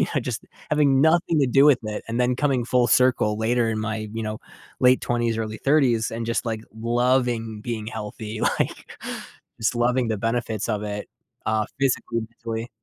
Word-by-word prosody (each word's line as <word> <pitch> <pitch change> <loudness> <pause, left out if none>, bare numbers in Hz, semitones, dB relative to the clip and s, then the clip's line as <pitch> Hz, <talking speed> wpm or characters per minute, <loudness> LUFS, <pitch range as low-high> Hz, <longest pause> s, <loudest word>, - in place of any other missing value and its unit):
I - - +3
just - - -4 0.3
having 140 -3 +3
nothing 165 +1 +3
to 135 - +3
do 135 +3 +5
with 145 -4 +6
it, 105 -1 -4
and 115 +2 -2
then 125 0 +2
coming 135 -3 +1
full 125 0 +3
circle 110 -3 +3
later 115 +1 +2
in 110 - -2
my, 110 0 -3
you 115 - -3
know, 110 0 -3 0.4
late 125 0 +5
20's, 120 -2 0
early 110 -1 -3
30's 130 -7 +3
and 115 0 -4
just, 115 +2 -1
like, 110 -2 -2
loving 120 -1 0
being 115 -3 -4
healthy, 110 0 -6
like, - - -1 0.7
just 110 +2 +1
loving 120 +1 +2
the 110 -1 -1
benefits 115 0 -1
of 105 -2 0
it, 105 0 -4 0.4
uh, 110 0 +1
physically 125 -3 0
and 110 - -6
mentally. 115 0 -5
115 Hz, 180 wpm, -24 LUFS, 110-125 Hz, 0.7 s, with